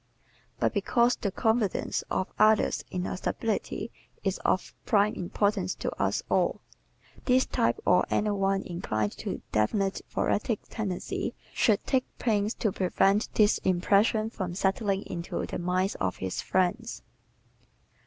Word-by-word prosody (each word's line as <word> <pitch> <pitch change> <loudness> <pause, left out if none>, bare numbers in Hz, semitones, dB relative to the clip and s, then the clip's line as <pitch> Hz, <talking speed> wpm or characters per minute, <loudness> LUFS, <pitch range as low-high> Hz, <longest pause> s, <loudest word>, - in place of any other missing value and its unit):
But - - +1
because 240 0 +2
the 200 - -2
confidence 220 +1 0
of 190 - 0
others 215 0 +4
in 180 0 -3
our - - -3
stability 220 +2 -2 0.3
is 195 -1 -1
of 185 - 0
prime 210 0 +3
importance 190 +1 0
to - - -3
us - - +1
all, - - +1 0.7
this 255 0 +4
type 115 +1 +1
or 180 - +5
any 210 0 +1
one 195 -1 +1
inclined 110 - -2
to - - -4
definite 190 - +1
thoracic 215 +1 0
tendencies 195 -5 -3 0.2
should 215 -4 +2
take 260 -2 +1
pains 215 -2 +1
to 215 - 0
prevent 195 +2 +2
this 210 -1 +4
impression 205 +4 +2
from 180 -6 -4
settling 195 +1 0
into 170 -1 -4
the - - -5
minds 185 +2 0
of 95 -1 -2
his 95 -1 -3
friends. 200 +6 -1
195 Hz, 135 wpm, -28 LUFS, 185-215 Hz, 0.7 s, or